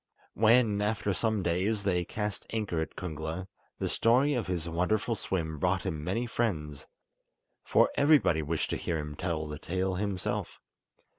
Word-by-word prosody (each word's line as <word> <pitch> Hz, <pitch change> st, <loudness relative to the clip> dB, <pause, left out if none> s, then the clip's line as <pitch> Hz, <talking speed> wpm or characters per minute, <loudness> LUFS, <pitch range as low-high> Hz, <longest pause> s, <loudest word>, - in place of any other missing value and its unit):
When, 110 Hz, -1 st, +4 dB
after 105 Hz, -1 st, 0 dB
some 110 Hz, 0 st, 0 dB
days, 95 Hz, +5 st, 0 dB
they 90 Hz, -3 st, +1 dB
cast 105 Hz, +3 st, -4 dB
anchor 105 Hz, -7 st, -1 dB
at 80 Hz, -, -5 dB
Kungla, 80 Hz, +1 st, -4 dB, 0.3 s
the -, -, -1 dB
story 130 Hz, +6 st, +3 dB
of 120 Hz, -6 st, -1 dB
his 85 Hz, -3 st, -2 dB
wonderful 90 Hz, +7 st, 0 dB
swim 80 Hz, -6 st, -3 dB
brought 90 Hz, +3 st, +1 dB
him 75 Hz, -1 st, -3 dB
many 100 Hz, +9 st, -1 dB
friends, 80 Hz, -12 st, -2 dB, 0.8 s
for -, -, +4 dB
everybody 140 Hz, -, +4 dB
wished 80 Hz, +1 st, -2 dB
to -, -, 0 dB
hear 85 Hz, -, -2 dB
him 75 Hz, -1 st, -5 dB
tell 80 Hz, -2 st, -2 dB
the 75 Hz, 0 st, -6 dB
tale 95 Hz, +3 st, -1 dB
himself. 100 Hz, -2 st, -2 dB
95 Hz, 155 wpm, -30 LUFS, 80-110 Hz, 0.8 s, When